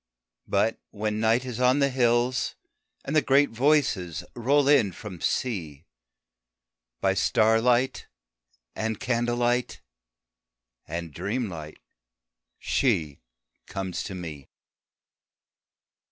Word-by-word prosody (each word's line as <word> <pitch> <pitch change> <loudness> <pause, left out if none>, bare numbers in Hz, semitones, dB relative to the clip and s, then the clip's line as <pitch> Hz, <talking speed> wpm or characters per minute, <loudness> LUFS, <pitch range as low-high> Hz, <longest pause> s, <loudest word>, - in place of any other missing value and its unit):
But 115 - +1
when 105 0 -3
Night 115 +3 +2
is 125 -3 -5
on 125 +2 +4
the 140 -1 +2
hills, 120 0 +1 0.5
and 145 - -2
the 155 - +6
great 140 +2 +3
Voices 115 - +1
Roll 140 +4 +2
in 130 -10 +4
from 95 -4 -9
Sea, 85 - -2 1.2
By 95 -1 +3
starlight 115 +5 +2 0.7
and 110 -1 -2
candle 120 0 0
light 120 +1 0 1.1
and 85 -1 -5
dreamlight 95 - -4 0.8
She 85 - 0 0.5
comes 95 -2 -4
to 95 - -6
me. 80 -6 -8
115 Hz, 95 wpm, -26 LUFS, 95-125 Hz, 1.2 s, the